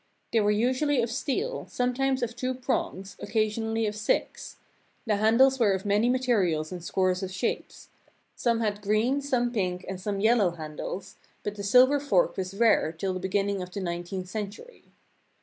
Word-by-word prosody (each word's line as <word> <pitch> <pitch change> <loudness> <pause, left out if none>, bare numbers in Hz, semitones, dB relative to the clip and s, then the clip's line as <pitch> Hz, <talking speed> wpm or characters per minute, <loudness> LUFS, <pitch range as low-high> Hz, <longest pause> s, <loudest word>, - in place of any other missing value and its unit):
They 230 - +4
were 205 -1 +2
usually 255 +6 +2
of 230 - -2
steel, 395 - -2
sometimes 255 +1 0
of 235 0 -3
two 255 +1 -2
prongs, 195 -6 -3
occasionally 225 0 -1
of 210 0 -2
six; 215 0 -2 0.5
the 215 -3 +1
handles 250 +5 +4
were 210 -4 +4
of 190 +1 -3
many 205 +4 +2
materials 200 -12 +1
and 180 -2 -6
scores 185 +1 0
of 190 - -3
shapes; 185 +5 -4 0.5
some 235 -1 +1
had 210 -2 -1
green, 215 +7 +1
some 250 -4 0
pink, 185 -4 -2
and 190 -1 -5
some 200 0 -2
yellow 220 -2 +4
handles, 160 +4 -6 0.3
but 210 - -3
the 205 - -7
silver 255 +8 +5
fork 195 -11 +2
was 190 0 -4
rare 225 -7 +3
till 185 +4 -3
the 185 - -3
beginning 195 +1 -1
of 180 - -6
the 200 - -6
nineteenth 175 +1 -4
century. 215 - -7
210 Hz, 170 wpm, -27 LUFS, 190-245 Hz, 0.5 s, silver